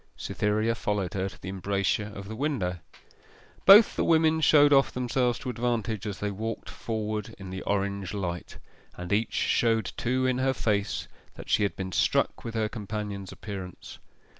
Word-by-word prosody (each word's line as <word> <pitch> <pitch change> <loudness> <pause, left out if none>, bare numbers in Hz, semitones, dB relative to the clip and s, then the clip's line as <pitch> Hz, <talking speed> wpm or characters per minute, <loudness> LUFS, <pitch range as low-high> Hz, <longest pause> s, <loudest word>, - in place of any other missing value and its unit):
Cytherea 110 +2 0
followed 105 -5 -2
her 95 0 -1
to - - -15
the 95 - -7
embrasure 100 +2 -1
of 100 0 -8
the 110 - -6
window. 110 - -1 0.9
Both 205 +3 +9
the - - +1
women 160 -1 +3
showed 145 -1 +6
off 135 -1 +5
themselves 125 0 0
to 130 - -6
advantage 115 -3 -2
as 100 -3 -4
they 105 0 -2
walked 110 +3 -5
forward 110 -2 -4
in 95 -2 -8
the 95 0 -5
orange 100 -1 -1
light; 90 -4 -4 0.4
and 90 +2 -4
each 110 +2 0
showed 115 -3 +1
too 130 +2 0
in 130 0 +1
her 130 0 +2
face 105 -3 -1 0.3
that - - -8
she - - +4
had 100 - 0
been 95 -1 -5
struck - - +1
with 115 -1 -6
her 110 -1 +1
companion's 105 -3 -5
appearance. 95 -4 -8
105 Hz, 170 wpm, -27 LUFS, 100-120 Hz, 0.9 s, Both